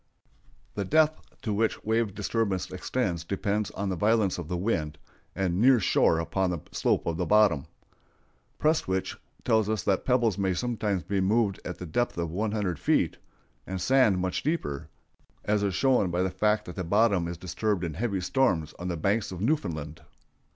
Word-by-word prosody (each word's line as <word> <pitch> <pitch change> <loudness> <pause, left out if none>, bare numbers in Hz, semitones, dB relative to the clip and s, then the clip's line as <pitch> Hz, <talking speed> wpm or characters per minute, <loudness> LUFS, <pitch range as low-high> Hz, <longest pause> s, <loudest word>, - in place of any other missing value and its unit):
The 100 - -2
depth 155 +8 +1
to 110 - -1
which 110 +2 0
wave 110 -2 0
disturbance 105 -3 -1
extends 90 -3 -2
depends 100 +3 -1
on 100 -1 -4
the 95 - -1
violence 105 0 +2
of 85 - -6
the 90 +1 -2
wind, 80 -6 -1 0.4
and 95 0 0
near 130 0 +6
shore 85 -4 +3
upon 90 +3 0
the 90 - -1
slope - - 0
of 85 -1 -1
the 90 - -1
bottom. 105 -10 +4 0.9
Prestwich 125 - 0 0.3
tells 110 -2 +2
us 110 -4 -1
that 95 -2 +1
pebbles 120 -6 +2
may 95 -2 +1
sometimes 105 -4 -1
be 95 +3 -1
moved 100 0 +1
at 90 - -6
the 90 - -7
depth 120 +8 -1
of 85 -2 -2
one 105 +5 -1
hundred 100 -7 -2
feet, - - +1 0.5
and 95 0 -3
sand 125 -3 +4
much 90 0 -1
deeper, 140 - -2 0.6
as 105 0 +1
is 100 -3 0
shown 130 -7 +3
by 90 +1 0
the 95 - -1
fact 105 +3 +1
that 90 - -8
the 95 - -2
bottom 100 -1 +2
is 85 0 -5
disturbed 95 +2 -2
in 85 -3 -3
heavy 100 0 -2
storms 90 - +1
on 90 - -4
the 85 -2 -2
Banks 100 +6 0
of 90 - -6
Newfoundland. 85 - -2
100 Hz, 180 wpm, -27 LUFS, 90-110 Hz, 0.9 s, near